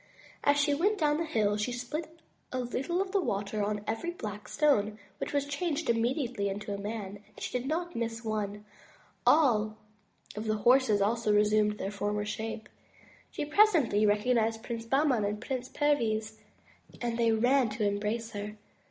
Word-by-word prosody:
As 285 0 +4
she 290 0 +3
went 400 +9 +2
down 300 -4 +2
the 335 - -1
hill, 210 -8 +1
she 215 +4 -1
spilt 250 +7 -4 0.4
a 255 - -2
little 275 +9 -1
of 380 - -10
the 395 -1 +2
water 210 - -2
on 210 0 -1
every 225 +12 -2
black 210 - -6
stone, 215 -9 +2 0.2
which - - -3
was 285 -1 +1
changed 295 0 -1
immediately 235 -2 0
into 205 +1 -4
a - - -3
man; 205 -1 -5
and 205 - -23
as - - -7
she - - -4
did 250 - -6
not 345 +3 -2
miss 230 0 -3
one 215 -2 0
stone, 210 0 -13 0.6
all 220 -8 +4 0.6
of 215 +1 -4
the 215 0 0
horses 245 -5 +5
also 225 +1 +1
resumed 210 0 +3
their 195 - -3
former 205 0 -2
shape. 220 +1 -4 0.6
She - - -4
presently 300 - +4
recognized 225 +1 +2
Prince 230 -1 -5
Bahman 270 -3 +2
and 205 +1 -1
Prince 255 +1 -4
Perviz, 220 -7 0 0.6
and 235 -1 -2
they 230 -1 +4
ran 245 +2 +3
to 210 0 -2
embrace 210 +3 -1
her. 210 0 -6
225 Hz, 175 wpm, -30 LUFS, 210-280 Hz, 0.6 s, horses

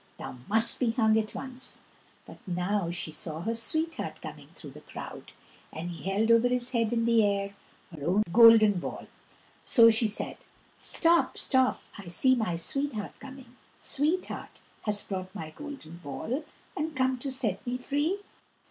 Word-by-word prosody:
Thou - - -8
must 225 +2 +4
be 235 -3 +1
hung 220 -2 +3
at 215 -1 -4
once." 260 -1 -7 0.4
But - - -13
now 180 +1 -1
she 170 -2 -3
saw 155 0 -2
her 225 +6 -1
sweetheart 315 +8 -2
coming - - -9
through - - -10
the - - -13
crowd, - - -9 0.4
and 170 +2 -5
he 175 +3 -6
held 215 +4 +2
over 230 +1 +5
his 250 0 +2
head 230 -3 +1
in 230 -1 +1
the 230 -1 +4
air 200 -1 0 0.4
her 145 - -9
own 195 +5 +3
golden 225 -4 +7
ball; - - -6 0.6
so 230 -3 +7
she 225 0 +1
said: 210 - -3 0.4
"Stop, 335 +1 +1
stop, 260 -1 +2 0.2
I 195 - -10
see 260 +10 +5
my 220 -9 0
sweetheart 220 +5 -1
coming! 265 -2 -12 0.2
Sweetheart, 315 +6 -2 0.3
hast 210 -1 -1
brought 185 0 -5
my 160 -6 -6
golden 275 - -9
ball 175 - -5 0.3
And 310 +1 -3
come 260 -1 +1
to 275 +2 -4
set 250 -3 -1
me 245 +1 -1
free?" 290 +9 -1
230 Hz, 165 wpm, -28 LUFS, 200-260 Hz, 0.6 s, golden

